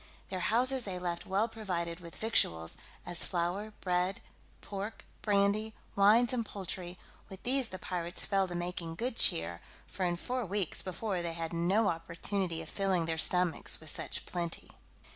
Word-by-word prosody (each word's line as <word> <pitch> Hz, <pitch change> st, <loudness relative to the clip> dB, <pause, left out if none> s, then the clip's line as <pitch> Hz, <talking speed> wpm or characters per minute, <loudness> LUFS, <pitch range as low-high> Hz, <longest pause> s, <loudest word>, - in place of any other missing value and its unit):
Their 185 Hz, -, -3 dB
houses 250 Hz, +6 st, +2 dB
they 190 Hz, -4 st, -3 dB
left 175 Hz, -1 st, -3 dB
well 200 Hz, +4 st, +2 dB
provided 180 Hz, -7 st, -3 dB
with 170 Hz, -2 st, -10 dB
victuals, 85 Hz, -, +1 dB, 0.3 s
as 175 Hz, -1 st, +1 dB
flour, 185 Hz, +4 st, -1 dB
bread, 180 Hz, +1 st, +1 dB, 0.4 s
pork, 200 Hz, +2 st, -6 dB, 0.2 s
brandy, 210 Hz, +1 st, +2 dB, 0.2 s
wines, 225 Hz, +5 st, +6 dB
and 240 Hz, -2 st, +1 dB
poultry, 185 Hz, -3 st, -5 dB, 0.3 s
with 190 Hz, -1 st, -10 dB
these 260 Hz, 0 st, +4 dB
the 185 Hz, -, -6 dB
pirates 175 Hz, -1 st, -2 dB
fell 195 Hz, -1 st, +2 dB
to 175 Hz, -, -4 dB
making 175 Hz, -1 st, -3 dB
good 240 Hz, +7 st, -2 dB
cheer, 85 Hz, -, +5 dB, 0.2 s
for 190 Hz, -, -4 dB
in 175 Hz, -1 st, +2 dB
four 250 Hz, +7 st, -2 dB
weeks 195 Hz, -3 st, -1 dB
before 190 Hz, 0 st, -2 dB
they 170 Hz, -1 st, -2 dB
had 165 Hz, 0 st, -4 dB
no 185 Hz, +6 st, +3 dB
opportunity 170 Hz, 0 st, -1 dB
of 160 Hz, -, -11 dB
filling 190 Hz, -4 st, +1 dB
their 160 Hz, 0 st, -1 dB
stomachs 180 Hz, 0 st, +2 dB
with 160 Hz, -2 st, +2 dB
such -, -, -2 dB
plenty. 170 Hz, -2 st, -4 dB
185 Hz, 160 wpm, -32 LUFS, 170-210 Hz, 0.4 s, wines